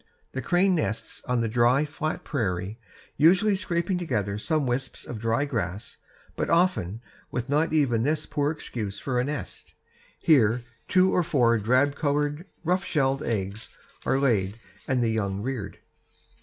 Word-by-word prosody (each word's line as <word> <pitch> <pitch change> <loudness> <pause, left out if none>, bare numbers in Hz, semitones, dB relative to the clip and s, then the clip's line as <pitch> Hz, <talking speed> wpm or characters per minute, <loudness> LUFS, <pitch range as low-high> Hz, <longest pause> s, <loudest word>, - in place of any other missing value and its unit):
The 130 - -3
crane 180 +8 +3
nests 150 -10 -2
on 125 -2 +1
the 115 - 0
dry, 120 +5 +3
flat 155 +1 -4
prairie, 100 - -2 0.4
usually 190 +6 +5
scraping 180 -1 -1
together 105 - -1
some 155 +4 0
wisps 125 +1 -3
of 115 - -6
dry 115 +5 +1
grass, 105 -8 -4 0.4
but - - -2
often 165 - +2 0.3
with 125 +1 -4
not 150 +3 +2
even 135 -8 +2
this 150 +5 0
poor 145 -1 0
excuse 110 -9 -4
for 125 -3 -1
a - - +2
nest. 145 +2 -6 0.4
Here 120 -6 +4 0.2
two 185 0 +4
to 180 - +4
four 125 -8 +3
drab 125 +7 +3
brown 140 - -16
colored, 145 +2 0 0.2
rough 180 +3 +1
shelled 135 -4 +1
eggs 105 -1 -3 0.3
are 135 - +2
laid 110 -6 +1 0.3
and 130 -2 +1
the 115 - +2
young 100 -3 -1
reared. 120 -6 -4
130 Hz, 155 wpm, -26 LUFS, 115-155 Hz, 0.4 s, usually